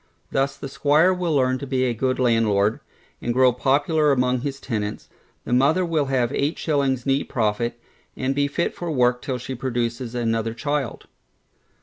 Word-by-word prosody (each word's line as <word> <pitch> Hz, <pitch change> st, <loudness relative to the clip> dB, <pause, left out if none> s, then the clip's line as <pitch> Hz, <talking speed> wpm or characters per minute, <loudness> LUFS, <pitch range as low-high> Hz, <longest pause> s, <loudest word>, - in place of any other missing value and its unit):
Thus 135 Hz, 0 st, 0 dB
the -, -, -6 dB
squire 150 Hz, +6 st, +3 dB
will 175 Hz, -4 st, -1 dB
learn 130 Hz, -1 st, +2 dB
to 140 Hz, -, -6 dB
be 130 Hz, -1 st, 0 dB
a 125 Hz, -2 st, +1 dB
good 130 Hz, +3 st, -1 dB
landlord, 110 Hz, -4 st, +2 dB, 0.4 s
and 120 Hz, 0 st, -2 dB
grow 130 Hz, -1 st, +5 dB
popular 145 Hz, +4 st, +2 dB
among 125 Hz, -2 st, +1 dB
his 135 Hz, 0 st, -4 dB
tenants, 105 Hz, -5 st, -4 dB, 0.4 s
the -, -, -2 dB
mother 150 Hz, +9 st, +3 dB
will 160 Hz, -4 st, 0 dB
have 130 Hz, -2 st, 0 dB
eight 145 Hz, +3 st, -1 dB
shillings 135 Hz, -5 st, 0 dB
neat 135 Hz, 0 st, 0 dB
profit, 120 Hz, +1 st, -1 dB, 0.4 s
and 130 Hz, +1 st, 0 dB
be 140 Hz, +1 st, +1 dB
fit 155 Hz, +4 st, -1 dB
for 175 Hz, -, -5 dB
work 125 Hz, -4 st, +2 dB
till 130 Hz, -2 st, -3 dB
she 125 Hz, +2 st, -6 dB
produces 120 Hz, -1 st, -3 dB
another 115 Hz, -1 st, -1 dB
child. 145 Hz, 0 st, -3 dB
130 Hz, 175 wpm, -23 LUFS, 120-140 Hz, 0.4 s, grow